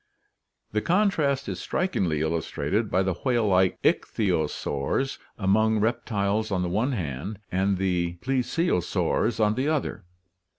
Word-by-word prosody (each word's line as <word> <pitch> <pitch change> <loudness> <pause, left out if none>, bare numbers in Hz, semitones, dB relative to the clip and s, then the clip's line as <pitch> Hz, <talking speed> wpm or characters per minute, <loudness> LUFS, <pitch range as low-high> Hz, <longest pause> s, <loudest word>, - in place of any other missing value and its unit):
The 105 - 0
contrast 160 - +1
is - - -4
strikingly 90 - -1
illustrated 85 +7 -1
by 95 - +2
the 95 0 0
whale 120 -4 +2
like 95 -1 +3
ichthyosaurs 85 - 0 0.2
among 110 +2 +2
reptiles 110 -2 0
on 90 -2 +1
the 90 - -1
one 110 +9 0
hand 85 - -4
and 95 +1 +1
the 90 -2 0
plesiosaurs 125 - 0
on 105 -1 +3
the 130 +5 -1
other 155 -2 0
(see - - -20
Figs. - - -30
105 Hz, 135 wpm, -26 LUFS, 90-125 Hz, 0.2 s, like